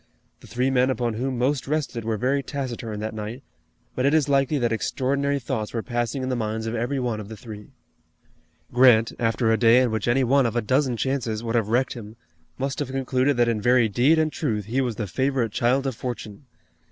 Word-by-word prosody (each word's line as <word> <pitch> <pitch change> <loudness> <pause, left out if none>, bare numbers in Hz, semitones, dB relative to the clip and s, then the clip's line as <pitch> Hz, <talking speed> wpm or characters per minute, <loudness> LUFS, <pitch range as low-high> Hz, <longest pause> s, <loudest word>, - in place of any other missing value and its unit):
The - - -15
three 125 +2 0
men 130 0 +3
upon 120 -3 -1
whom 130 +3 -2
most 130 +2 0
rested 140 -6 -2
were 110 -1 -1
very 135 +5 +1
taciturn 120 -6 -5
that 110 0 -4
night, 110 +5 -6 0.5
but 130 - -2
it 140 +3 +3
is 150 -3 +3
likely 140 +1 +2
that 120 -3 0
extraordinary 140 +5 0
thoughts 120 -4 -4
were 115 - -2
passing 120 +2 -2
in 130 - -2
the 130 - 0
minds 110 -1 -3
of 115 - -3
every 120 +4 -1
one 120 -4 -2
of 105 - -7
the 110 - -8
three. 105 -3 -10 1.1
Grant, 120 -3 +5
after 115 0 +1
a 110 - +3
day 115 +1 +6
in 125 -3 +2
which 110 0 -2
any 125 +3 +3
one 135 +1 +3
of 115 - -4
a 120 - +2
dozen 130 +1 +1
chances 120 -4 -2
would 115 -1 -3
have 115 -4 +1
wrecked 125 +3 +1
him, 110 -2 -10 0.4
must 135 0 -3
have 145 -3 -2
concluded 130 0 0
that 120 -1 +3
in 115 -3 0
very 120 0 +4
deed 125 +10 +3
and 155 -1 +1
truth 110 - -2
he 125 +6 0
was 120 -4 -2
the 105 - -3
favorite 130 +2 -1
child 125 +5 +1
of 135 - -1
Fortune. 120 +1 -7
125 Hz, 220 wpm, -24 LUFS, 115-135 Hz, 1.1 s, day